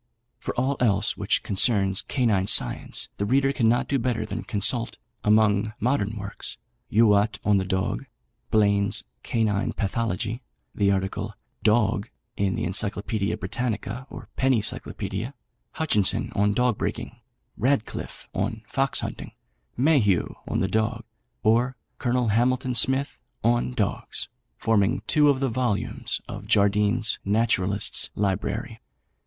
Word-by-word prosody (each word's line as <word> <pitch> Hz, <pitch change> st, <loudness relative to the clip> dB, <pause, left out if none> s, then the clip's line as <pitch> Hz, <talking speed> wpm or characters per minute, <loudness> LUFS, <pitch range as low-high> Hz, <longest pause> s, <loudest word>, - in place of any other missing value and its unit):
For -, -, -4 dB
all 130 Hz, +2 st, 0 dB
else 105 Hz, -4 st, +2 dB
which -, -, 0 dB
concerns 95 Hz, -2 st, +2 dB
Canine 110 Hz, -8 st, +1 dB
Science 110 Hz, -, +2 dB
the 100 Hz, -, -1 dB
reader 135 Hz, +3 st, +3 dB
cannot 120 Hz, -2 st, +2 dB
do 140 Hz, -, +1 dB
better 115 Hz, -2 st, -1 dB
than 110 Hz, +1 st, -4 dB
consult, 115 Hz, +3 st, +1 dB, 0.3 s
among 105 Hz, 0 st, +3 dB
modern 110 Hz, -3 st, 0 dB
works, 100 Hz, 0 st, -6 dB, 0.3 s
"Youatt 105 Hz, -1 st, +4 dB
on 105 Hz, -1 st, +4 dB
the 95 Hz, -, 0 dB
Dog," 95 Hz, 0 st, -1 dB, 0.4 s
"Blaine's 100 Hz, -1 st, +2 dB, 0.2 s
Canine 110 Hz, -3 st, 0 dB
Pathology," 110 Hz, +2 st, -2 dB, 0.3 s
the 100 Hz, -1 st, +2 dB
article 100 Hz, +2 st, -1 dB, 0.3 s
"Dog" 110 Hz, -1 st, +2 dB, 0.3 s
in 100 Hz, -2 st, 0 dB
the -, -, -2 dB
Encyclopædia 100 Hz, +2 st, -1 dB
Britannica 120 Hz, +5 st, -3 dB
or -, -, -9 dB
Penny 130 Hz, -3 st, +3 dB
Cyclopædia, 115 Hz, +4 st, -2 dB, 0.4 s
"Hutchinson 105 Hz, -, +1 dB
on 105 Hz, 0 st, +2 dB
Dog 125 Hz, -3 st, +1 dB
Breaking," -, -, -4 dB, 0.4 s
"Radcliffe 130 Hz, -1 st, -2 dB
on 110 Hz, 0 st, -2 dB
Fox 135 Hz, +1 st, 0 dB
Hunting," -, -, -6 dB, 0.4 s
"Mayhew 125 Hz, -, +3 dB
on -, -, -1 dB
the 95 Hz, -, +1 dB
Dog," 110 Hz, +3 st, -1 dB, 0.4 s
or, 120 Hz, +4 st, +3 dB, 0.2 s
"Colonel 125 Hz, -2 st, +1 dB
Hamilton 125 Hz, +3 st, +1 dB
Smith 130 Hz, +4 st, +1 dB, 0.2 s
on -, -, +2 dB
Dogs," -, -, -2 dB, 0.3 s
forming 105 Hz, -3 st, +1 dB
two 150 Hz, -1 st, +4 dB
of 135 Hz, -2 st, +2 dB
the 135 Hz, -1 st, 0 dB
vols. 120 Hz, -3 st, -1 dB
of 105 Hz, 0 st, -8 dB
Jardine's 105 Hz, +1 st, +2 dB
Naturalists' 100 Hz, -1 st, +1 dB
Library. 95 Hz, -2 st, -2 dB
110 Hz, 125 wpm, -25 LUFS, 100-125 Hz, 0.4 s, Youatt